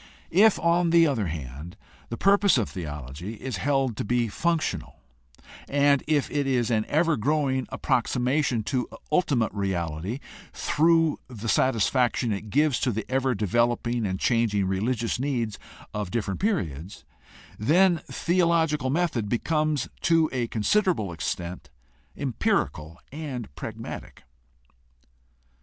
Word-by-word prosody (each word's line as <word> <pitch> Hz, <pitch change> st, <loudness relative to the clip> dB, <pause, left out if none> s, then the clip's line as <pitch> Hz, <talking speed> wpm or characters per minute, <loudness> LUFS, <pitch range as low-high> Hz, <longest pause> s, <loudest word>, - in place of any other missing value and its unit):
If, 205 Hz, +5 st, +5 dB
on 170 Hz, 0 st, +2 dB
the 165 Hz, 0 st, +6 dB
other 125 Hz, -, 0 dB
hand, 75 Hz, +1 st, -7 dB, 0.3 s
the 115 Hz, -, -4 dB
purpose 200 Hz, -3 st, +4 dB
of 115 Hz, -, +1 dB
theology 75 Hz, -, -6 dB
is 125 Hz, -1 st, -5 dB
held 135 Hz, 0 st, 0 dB
to -, -, -2 dB
be 120 Hz, +1 st, 0 dB
functional 165 Hz, +8 st, -2 dB, 0.7 s
and 140 Hz, 0 st, +3 dB
if 150 Hz, -2 st, +2 dB
it 145 Hz, -2 st, 0 dB
is 125 Hz, -3 st, +1 dB
an 110 Hz, -1 st, +1 dB
ever 165 Hz, +1 st, +2 dB
growing 135 Hz, 0 st, 0 dB
approximation 125 Hz, 0 st, 0 dB
to 125 Hz, +2 st, -2 dB, 0.2 s
ultimate 145 Hz, -9 st, +1 dB
reality 95 Hz, 0 st, -2 dB, 0.4 s
through 165 Hz, 0 st, +2 dB
the 115 Hz, -3 st, -7 dB
satisfaction 120 Hz, 0 st, +2 dB
it 105 Hz, +2 st, -6 dB
gives 145 Hz, +1 st, +2 dB
to 125 Hz, -, +1 dB
the 110 Hz, 0 st, -3 dB
ever 130 Hz, -1 st, +1 dB
developing 120 Hz, +2 st, 0 dB
and 95 Hz, 0 st, -3 dB
changing 115 Hz, -5 st, +1 dB
reli 95 Hz, +7 st, 0 dB
gious 115 Hz, +1 st, -2 dB
needs 120 Hz, -6 st, -2 dB, 0.3 s
of 105 Hz, -3 st, -3 dB
different 100 Hz, -2 st, -2 dB
periods, 95 Hz, -, -2 dB, 0.5 s
then 170 Hz, -, +4 dB
theological 165 Hz, -6 st, +1 dB
method 140 Hz, -9 st, 0 dB
becomes 150 Hz, +2 st, 0 dB
to 165 Hz, -2 st, +3 dB
a 120 Hz, -2 st, -1 dB
considerable 115 Hz, -, +1 dB
extent 85 Hz, 0 st, -4 dB, 0.5 s
empirical 85 Hz, -, -1 dB
and 135 Hz, -, -6 dB
pragmatic. -, -, -8 dB
125 Hz, 125 wpm, -26 LUFS, 105-150 Hz, 0.7 s, the